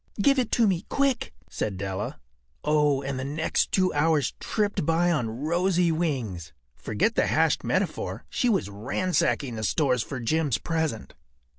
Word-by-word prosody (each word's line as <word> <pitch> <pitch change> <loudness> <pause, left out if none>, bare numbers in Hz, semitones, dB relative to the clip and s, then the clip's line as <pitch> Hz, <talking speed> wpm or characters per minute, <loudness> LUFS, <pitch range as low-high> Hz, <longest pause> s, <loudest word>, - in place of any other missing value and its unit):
“Give 275 +6 +4
it 245 - -1
to 235 - +4
me 190 -3 0
quick,” 275 -3 +1 0.2
said 100 -3 -3
Della. 95 +1 -4 0.4
Oh, 150 -2 +2
and 135 -1 -3
the - - -3
next 150 +4 0
two 185 -1 +2
hours 150 -2 +2
tripped 210 -5 -1
by 165 +3 +2
on 125 -9 0
rosy 170 +8 +1
wings. 120 - -2 0.2
Forget 110 - 0
the - - +2
hashed - - +2
metaphor. - - -2
She 250 - 0
was 195 - +1
ransacking 130 - -1
the 110 - -4
stores 125 +2 +2
for 130 +3 -5
Jim’s 145 0 +1
present. 160 -5 -2
150 Hz, 155 wpm, -26 LUFS, 120-175 Hz, 0.4 s, Give